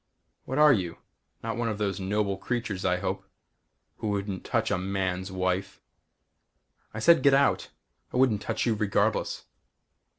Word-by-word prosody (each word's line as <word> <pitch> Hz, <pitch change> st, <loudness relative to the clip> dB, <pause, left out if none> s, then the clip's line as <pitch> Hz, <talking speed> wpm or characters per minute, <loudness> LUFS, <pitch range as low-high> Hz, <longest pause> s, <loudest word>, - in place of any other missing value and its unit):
"What 130 Hz, -, -3 dB
are 150 Hz, -1 st, +7 dB
you? 90 Hz, -7 st, -2 dB, 0.5 s
Not 115 Hz, 0 st, -3 dB
one 120 Hz, -1 st, 0 dB
of 105 Hz, -, -3 dB
those 100 Hz, -1 st, -1 dB
noble 100 Hz, +1 st, 0 dB
creatures 110 Hz, -2 st, -3 dB
I 90 Hz, -1 st, +2 dB
hope -, -, -3 dB, 0.7 s
who 110 Hz, -, -4 dB
wouldn't 100 Hz, -2 st, -2 dB
touch -, -, 0 dB
a -, -, +2 dB
man's 95 Hz, 0 st, -2 dB
wife." 95 Hz, +1 st, -2 dB, 1.1 s
"I -, -, -9 dB
said 165 Hz, +10 st, +5 dB
get 140 Hz, -2 st, +5 dB
out! 140 Hz, 0 st, +2 dB, 0.4 s
I -, -, -2 dB
wouldn't 125 Hz, -5 st, +3 dB
touch -, -, -2 dB
you 115 Hz, -, +2 dB
regardless." 105 Hz, -2 st, 0 dB
100 Hz, 155 wpm, -27 LUFS, 95-115 Hz, 1.1 s, are